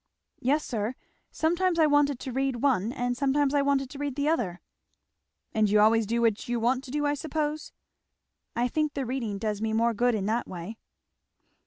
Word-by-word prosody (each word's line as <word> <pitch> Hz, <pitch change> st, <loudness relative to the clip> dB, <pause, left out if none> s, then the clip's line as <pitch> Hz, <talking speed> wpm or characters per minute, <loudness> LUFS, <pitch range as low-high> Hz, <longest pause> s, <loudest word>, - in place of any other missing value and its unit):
"Yes 285 Hz, +3 st, +1 dB
sir; 225 Hz, +1 st, -2 dB, 0.3 s
sometimes 345 Hz, +2 st, +1 dB
I 320 Hz, -, +5 dB
wanted 290 Hz, -2 st, +3 dB
to 260 Hz, -, -5 dB
read 265 Hz, -1 st, -1 dB
one, 240 Hz, -6 st, +2 dB
and 245 Hz, -2 st, -2 dB
sometimes 275 Hz, +2 st, +1 dB
I 285 Hz, -, +3 dB
wanted 280 Hz, -1 st, +1 dB
to 280 Hz, -, -9 dB
read 285 Hz, -2 st, -3 dB
the 285 Hz, +1 st, 0 dB
other." 200 Hz, -, -1 dB, 0.9 s
"And 215 Hz, -1 st, +2 dB
you 210 Hz, +1 st, +4 dB
always 220 Hz, 0 st, +4 dB
do 235 Hz, +2 st, 0 dB
what 225 Hz, -1 st, +1 dB
you 240 Hz, -1 st, 0 dB
want 250 Hz, +3 st, +1 dB
to -, -, -10 dB
do, 295 Hz, +2 st, -1 dB
I 290 Hz, -, +2 dB
suppose?" 305 Hz, +1 st, -3 dB, 0.8 s
"I 240 Hz, +1 st, +1 dB
think 305 Hz, +3 st, -1 dB
the 275 Hz, -2 st, -2 dB
reading 235 Hz, -5 st, -3 dB
does 210 Hz, 0 st, -2 dB
me 220 Hz, 0 st, -1 dB
more 230 Hz, +1 st, +2 dB
good 240 Hz, +2 st, +2 dB
in 200 Hz, -3 st, -2 dB
that 225 Hz, +3 st, 0 dB
way." 185 Hz, +5 st, -7 dB
255 Hz, 195 wpm, -27 LUFS, 225-290 Hz, 0.9 s, I